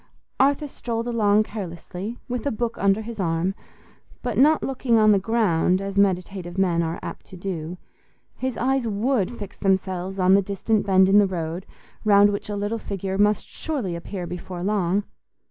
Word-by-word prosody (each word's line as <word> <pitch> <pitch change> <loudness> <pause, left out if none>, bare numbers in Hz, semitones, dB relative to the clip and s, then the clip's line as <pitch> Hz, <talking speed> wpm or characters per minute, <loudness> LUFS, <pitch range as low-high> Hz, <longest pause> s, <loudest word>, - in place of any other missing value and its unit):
Arthur 280 +3 +3
strolled 235 -4 -4
along 215 -3 +3
carelessly, 195 +1 -6
with 250 +2 -3
a - - +1
book 230 +1 -2
under 200 +2 +2
his 225 -1 -8
arm, 170 +1 0 0.7
but 245 -2 -2
not 300 +5 +4
looking 255 -3 +1
on 215 -1 +6
the 200 - +4
ground 190 -5 +2
as 195 0 -2
meditative 185 -2 0
men 175 -3 +2
are 165 0 -2
apt - - -7
to 185 - -11
do; 175 -2 -5 0.6
his 260 -2 -3
eyes 260 0 +1
would 225 +1 0
fix 205 -2 -8
themselves 190 -1 -1
on 185 0 +4
the 200 - +6
distant 200 +2 -1
bend 190 -1 +5
in 200 +2 +6
the 205 - +4
road 170 0 -4 0.4
round 205 -1 +6
which 200 +1 -4
a 205 - -2
little 205 +3 -2
figure 195 -2 -4
must 210 +1 +3
surely 250 - -3
appear 180 +2 -5
before 180 0 -6
long. 200 -1 +1
200 Hz, 175 wpm, -24 LUFS, 185-225 Hz, 0.7 s, on